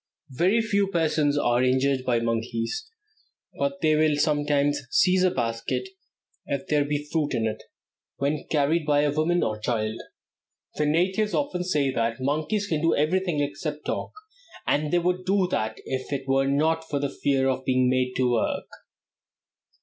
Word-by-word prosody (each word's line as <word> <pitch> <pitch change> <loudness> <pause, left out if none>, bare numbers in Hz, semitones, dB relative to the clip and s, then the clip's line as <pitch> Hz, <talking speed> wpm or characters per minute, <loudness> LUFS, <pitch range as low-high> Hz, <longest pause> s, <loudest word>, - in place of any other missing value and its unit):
Very 185 - +2
few 200 -2 +1
persons 155 -5 +1
are 120 -3 +2
injured 130 +1 +2
by 120 -2 +2
monkeys, 115 - -2 0.7
but 280 0 -1
they 155 - +3
will 155 -1 +3
sometimes 145 -1 +1
seize 185 +5 +3
a 185 - +5
basket, 115 - -2 0.6
if 140 -1 -2
there 150 -1 +2
be 145 0 -2
fruit 155 -3 0
in 115 - 0
it, 110 0 -3 0.6
when 145 +2 -2
carried 155 +2 +2
by 145 -1 +4
a 145 -1 +2
woman 160 +4 +1
or 110 0 -2
child. 110 0 -2 0.7
The 150 - 0
natives 185 +7 +1
often 185 -11 -1
say 150 -6 +1
that 115 -1 -1
"monkeys 155 +10 -1
can 160 -6 -1
do 165 0 +3
everything 170 0 +1
except 150 +1 -4
talk, - - -3 0.5
and 150 +1 +1
they 175 - +3
would 180 +1 0
do 190 0 +2
that 110 0 -1 0.5
were 135 0 +2
it - - -1
not 160 +3 +1
for 145 - -1
the 140 - 0
fear 135 -2 +1
of 130 0 -1
being 130 -1 +2
made 125 0 +1
to 130 - +2
work." 120 - -1
145 Hz, 165 wpm, -25 LUFS, 130-170 Hz, 0.7 s, a